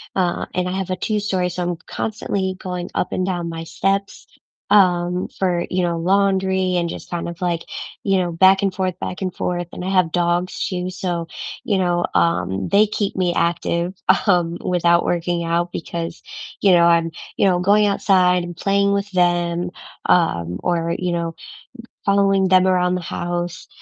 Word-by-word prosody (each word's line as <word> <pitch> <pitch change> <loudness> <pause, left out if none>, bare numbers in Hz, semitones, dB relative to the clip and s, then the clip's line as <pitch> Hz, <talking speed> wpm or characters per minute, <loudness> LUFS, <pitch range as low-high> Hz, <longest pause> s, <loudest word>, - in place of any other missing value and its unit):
uh, 180 -2 0
and 180 0 0
I 180 - -2
have 190 -1 -4
a 185 - 0
two-story, 195 -2 -1
so 180 +1 -4
I'm 175 -1 -2
constantly 200 -3 -2
going 180 -2 -5
up - - -1
and 185 - 0
down 175 -3 -2
my 165 0 -5
steps, 195 +4 -2 0.4
um, 180 -2 +3
for, 180 -2 0
you 185 0 0
know, 170 -1 0
laundry 190 0 +2
and 170 -1 0
just - - -8
kind 170 -1 -3
of, 170 0 -9
like, 175 -2 0 0.4
you 195 -1 +2
know, 180 -2 0
back 190 +4 +5
and 195 -2 +1
forth, 185 -2 -2
back 180 - -5
and 185 -1 -1
forth. 175 -1 -2
And - - -7
I - - -2
have 185 -4 +3
dogs, 175 +1 0
too, 180 -1 -3
so, 175 -2 -3 0.4
you 205 - +1
know, 175 -2 +1
um, 95 - +1
they 210 +2 +5
keep 205 -1 -2
me 180 -2 +1
active, 170 +1 0 0.3
um, 175 -3 +2
without 170 -1 +2
working 175 0 -1
out 170 +1 0
because, 170 0 -5 0.4
you 200 - +5
know, 170 -1 +6
I'm, 170 -1 +3 0.3
you - - +3
know, 180 -1 +2
going 205 +3 +4
outside 185 -3 +3
and 175 0 -7
playing 200 +1 +2
with 200 +1 -1
them, 175 -1 +1 0.4
um, 90 - +2
or, 170 -1 0
you 180 -1 -2
know, 170 -1 -2 0.7
following 195 -1 +3
them 185 0 +5
around 180 -1 +2
the 180 - -1
house, 175 0 -4
180 Hz, 180 wpm, -20 LUFS, 170-190 Hz, 0.7 s, know